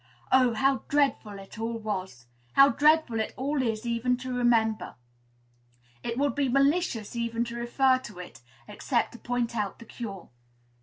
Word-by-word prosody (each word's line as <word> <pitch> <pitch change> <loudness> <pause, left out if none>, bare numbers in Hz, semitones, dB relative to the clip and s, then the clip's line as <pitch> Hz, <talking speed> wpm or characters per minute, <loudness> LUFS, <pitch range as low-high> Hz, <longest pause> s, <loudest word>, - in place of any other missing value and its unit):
Oh! 255 -3 +4
how 270 +4 +3
dreadful 275 -8 +1
it 195 +3 -11
all 230 +1 -2
was! 190 - -5 0.3
How 275 0 +7
dreadful 300 -5 +3
it 220 - -3
all 280 +2 -1
is, 225 -2 -2
even 240 +1 0
to 255 0 -5
remember! 230 -3 +1 1.1
It 230 - -4
would 285 +1 +1
be 280 -2 0
malicious 275 - +1
even 235 0 -1
to 235 0 -7
refer 255 +2 +2
to 210 -7 -11
it, 175 -10 -10 0.3
except 240 -4 -1
to 240 - -12
point 240 -1 -2
out 210 -3 -2
the 230 - -13
cure. 205 -6 -8
235 Hz, 160 wpm, -27 LUFS, 220-265 Hz, 1.1 s, How